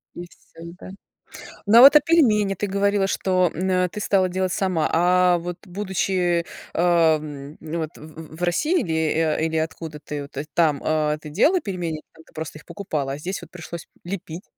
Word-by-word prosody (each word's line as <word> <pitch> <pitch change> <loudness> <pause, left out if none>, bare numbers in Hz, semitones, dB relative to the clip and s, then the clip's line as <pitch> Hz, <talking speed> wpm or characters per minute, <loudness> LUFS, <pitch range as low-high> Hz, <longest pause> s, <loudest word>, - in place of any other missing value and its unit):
И 175 - -7
всё, 170 0 -13
да. - - -10 0.8
Ну 220 +3 +5
а, - - +10
вот, 280 +3 +9
а - - +10
пельмени, 220 -12 +3
ты 205 +2 -3
говорила 200 0 +1
что, 185 -2 +1
м, 185 +4 -2
э, 180 -1 +2
ты 210 - -7
стала 190 -2 +2
делать 185 0 -1
сама, 180 -5 0
а 180 +1 +4
вот 175 0 -6
будучи, 185 -2 -1 0.3
ам, 155 -4 +1
вот, 160 0 -4
в 155 0 -11
в - - -14
в 175 - -6
России, 300 - +1
или 165 -3 -3 0.3
а 155 -1 0
или 160 0 0
откуда 160 -1 -4
ты 145 -1 -6
о 140 +2 -5
там, 155 -4 +2 0.5
делала 330 - +3
пельмени, 175 - -4
там 160 0 -17
ты - - -24
просто 155 -1 -7
их - - -19
покупала, 150 -9 -4
а - - -5
здесь 180 +5 -5
вот 170 - -12
пришлось 170 -1 -9 0.2
лепить? 175 -1 -6
175 Hz, 185 wpm, -23 LUFS, 160-195 Hz, 0.8 s, а